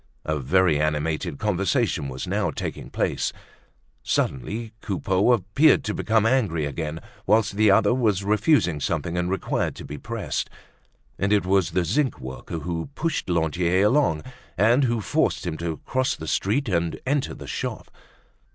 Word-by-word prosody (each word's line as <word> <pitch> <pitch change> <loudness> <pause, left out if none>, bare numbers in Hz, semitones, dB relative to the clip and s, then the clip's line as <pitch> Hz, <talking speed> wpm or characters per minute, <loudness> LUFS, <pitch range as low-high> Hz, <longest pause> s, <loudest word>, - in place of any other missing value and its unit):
A 75 -1 -1
very 80 +3 +3
animated 75 -1 -1
conversation 95 -7 0
was 65 +5 -5
now 100 0 0
taking - - -5
place. - - -1 0.7
Suddenly 110 - -2
Coupeau 95 +2 +1
appeared 120 - +4
to - - -2
become 110 -1 +1
angry 105 - +1
again, 75 +2 -4 0.3
whilst 105 0 +3
the 110 0 +4
other 100 +2 +5
was 105 -6 +1
refusing 105 - +2
something 85 +3 -2
and 90 0 0
required 95 -1 -1
to - - -9
be 75 0 -7
pressed. - - -3 0.7
And 95 +2 +1
it 105 -3 +3
was 95 -1 +2
the 90 +1 0
zinc 130 - 0
worker 65 +5 -6
who 85 - -4
pushed 160 - -2
Lantier 85 +3 +2
along 115 - +2 0.3
and 120 +8 +4
who 120 -2 0
forced 95 - 0
him 85 - -2
to 85 -1 -3
cross 130 0 0
the 80 - -8
street 115 - 0
and 85 -4 -1
enter 140 +1 0
the - - -9
shop. - - -5
95 Hz, 155 wpm, -24 LUFS, 80-110 Hz, 0.7 s, other